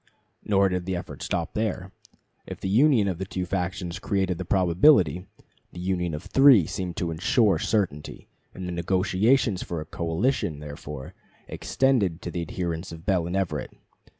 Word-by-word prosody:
Nor 100 -1 +3
did 90 -1 -3
the 95 - -1
efforts 90 - -6
stop 85 -2 -2
there. 95 -4 -2 0.6
If - - -7
the - - -4
union 120 -1 +4
of 90 -3 -2
the 95 - -3
two 90 -1 -4
factions 90 0 -3
created 95 -3 -1
the 95 - -4
probability, 90 - +3 0.5
the - - -8
union 90 -3 -1
of 75 - -7
three 135 - +6
seemed 90 0 -5
to 85 -2 -2
insure 100 +6 +2
certainty, 90 -9 -2 0.3
and 95 -1 -6
the - - -4
negotiations 95 +5 +1
for 85 - -4
a 75 - -6
coalition, 85 - -1
therefore, 75 -2 -8 0.3
extended 110 -11 0
to - - -4
the 85 - -3
adherents 85 +1 -4
of 80 +1 -10
Bell 90 -4 +1
and 90 - -3
Everett. 85 -8 -3
90 Hz, 165 wpm, -25 LUFS, 85-100 Hz, 0.6 s, three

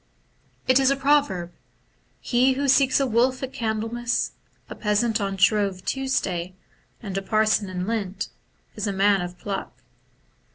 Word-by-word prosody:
It 255 +1 +5
is 265 -1 +4
a 275 - +3
proverb, 270 -11 +1 0.4
* - - -40 0.3
He 255 +2 +3
who 280 +2 -1
seeks 270 0 +4
a 275 - +2
wolf 255 +2 +1
at 265 - -5
Candlemas, 225 +2 -1 0.4
a - - -7
peasant 215 +1 0
on 195 -1 -2
Shrove 195 -1 +2
Tuesday, 185 -10 -2 0.5
and 195 -3 -5
a - - -7
parson 215 0 +1
in 180 -1 -3
Lent, 200 -3 -3 0.5
is 210 0 -3
a 200 - -1
man 195 0 +3
of 175 0 -6
pluck.' 200 -2 -6
215 Hz, 155 wpm, -24 LUFS, 195-255 Hz, 0.5 s, It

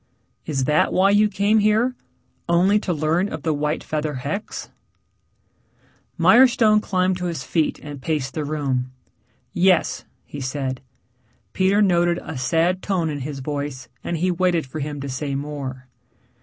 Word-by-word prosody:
"Is 140 -4 -1
that 150 +3 +2
why 195 +2 +4
you 210 +1 +4
came 205 +2 +2
here? 215 +4 +2 0.6
Only 185 +5 +4
to 195 - -3
learn 165 +4 +1
of 160 -3 -6
the 160 - +1
white 150 +1 -1
feather 155 -1 -3
hex?" 145 - -5 1.5
Mirestone 235 -4 +5
climbed 185 -2 0
to 180 - -4
his 165 -6 -3
feet 155 +3 0
and 145 -2 -8
paced 140 -2 -2
the 155 - -2
room. 135 -4 -2 0.6
"Yes," 180 -1 +2 0.2
he 145 - -8
said. 130 -1 -3 0.7
Peter 195 +2 +3
noted 175 -2 +3
a - - -7
sad 165 +8 +1
tone 180 -6 -1
in 145 - -4
his 140 0 -5
voice, 140 -2 -4
and 170 - -2
he 180 +3 +1
waited 175 -2 +1
for 145 +4 -7
him 145 0 -4
to 140 - -5
say 140 +1 -3
more. 135 -3 -5
160 Hz, 155 wpm, -22 LUFS, 145-185 Hz, 1.5 s, Mirestone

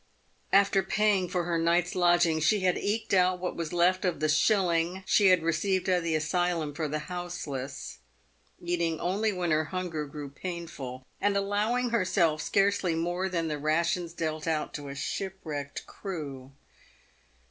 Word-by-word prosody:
After 200 0 +5
paying 195 -1 +1
for 180 -1 0
her 170 -1 0
night's 170 +2 +2
lodging 175 -2 +3
she 200 +6 +3
had 185 -1 +2
eked 210 +1 -2
out 185 -1 +4
what 180 0 -4
was 165 -2 -4
left 180 +2 +2
of 180 -3 0
the 155 - +1
shilling 175 +1 +2
she 200 +1 +4
had 185 -3 +5
received 185 +4 0
at 180 -1 +3
the 165 -1 0
asylum 165 -1 0
for 155 +1 -2
the 150 +1 -2
houseless, 140 - -5 0.6
PAVED - - -30
WITH - - -11
GOLD. 175 0 0
29 170 - +2
eating 160 -1 -3
only 205 +5 0
when 180 -3 -1
her 155 0 +2
hunger 165 -3 -3
grew 145 0 -7
painful, 140 -6 -6 0.2
and 205 -1 +2
allowing 215 +5 0
herself 180 -7 +2
scarcely 195 -2 +2
more 175 +3 -1
than 170 -3 -1
the 150 -1 -3
rations 165 +3 0
dealt 155 -1 -3
out 155 -2 -1
to 145 -1 -6
a 140 - -6
shipwrecked 155 -4 -4
crew. 140 -9 -7
175 Hz, 170 wpm, -28 LUFS, 155-185 Hz, 0.6 s, After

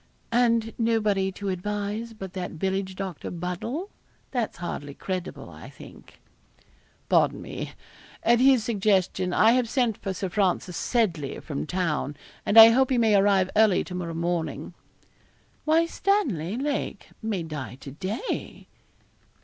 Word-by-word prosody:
'And 230 -1 +2
nobody 210 -4 +1
to 200 +1 -4
advise 210 +4 -3
but 195 -4 -8
that 185 -2 -4
village 190 +2 -2
doctor, 190 -4 -5
Buddle 180 - -4 0.4
that's 245 -4 -2
hardly 145 -5 -5
credible, 185 -2 -5
I - - -11
think.' - - -15 0.9
'Pardon - - +3
me. - - -6 0.5
At 235 0 +4
his 260 -3 +5
suggestion 190 -4 +1
I 220 +5 +5
have 245 -1 +2
sent 240 -5 +1
for 195 - -3
Sir 190 0 -3
Francis 185 -2 0
Seddley, 170 - 0
from 150 -1 -5
town, 160 -5 -1 0.3
and 205 - +3
I 225 0 +12
hope 260 +3 +3
he 260 - +2
may 225 -2 +4
arrive 195 -2 +3
early 215 -3 +4
to 180 - -9
morrow 170 -2 -4
morning.' 170 0 -2 0.9
'Why, 320 +2 +4
Stanley 250 - 0
Lake 285 +2 -3
may 215 -6 -2
die 150 -5 -6
to 135 - -8
day.' 190 - -5
200 Hz, 140 wpm, -26 LUFS, 180-230 Hz, 0.9 s, I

